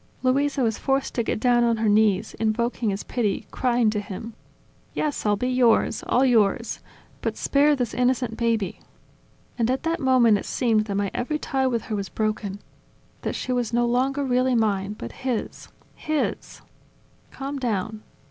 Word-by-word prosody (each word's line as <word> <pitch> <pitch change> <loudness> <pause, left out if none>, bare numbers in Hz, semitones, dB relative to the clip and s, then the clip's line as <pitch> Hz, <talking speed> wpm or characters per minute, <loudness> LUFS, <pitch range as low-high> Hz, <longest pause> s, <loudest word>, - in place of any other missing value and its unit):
Luisa 275 +1 +2
was 225 -2 0
forced 270 0 0
to 240 - 0
get 220 - -2
down 240 0 +3
on 230 -1 +2
her 220 0 0
knees, 210 -2 +3
invoking 225 +1 0
his 195 0 -3
pity, 215 -6 -1
crying 240 -3 +2
to 210 - -1
him: 210 +2 -7 0.6
"Yes, 295 -7 -1
I'll 205 - +3
be 250 +5 -2
yours, 250 -3 +3
all 255 +2 +3
yours!... 230 -2 +2 0.4
But - - -2
spare 290 +1 +3
this 245 -5 -2
innocent 250 -2 +1
baby.. 225 -5 -1 0.4
." - - -34
And 230 0 +2
at 260 +1 0
that 330 +1 0
moment 245 -5 +4
it - - -8
seemed 225 -4 +1
that 200 -2 -3
my 200 -1 0
every 280 +5 -1
tie 265 -3 0
with 235 -3 -1
her 215 - -4
was 200 -2 -3
broken, 215 -2 -2 0.6
that - - -3
she 255 - -3
was 245 -2 -1
no 240 0 +3
longer 265 +4 +1
really 255 0 +2
mine, 205 -3 +1
but 115 - -8
his, 255 -4 -4 0.3
hisV 310 -1 -2 0.7
"Calm 275 +1 -5
down! 220 -3 -2
235 Hz, 175 wpm, -24 LUFS, 215-255 Hz, 0.7 s, moment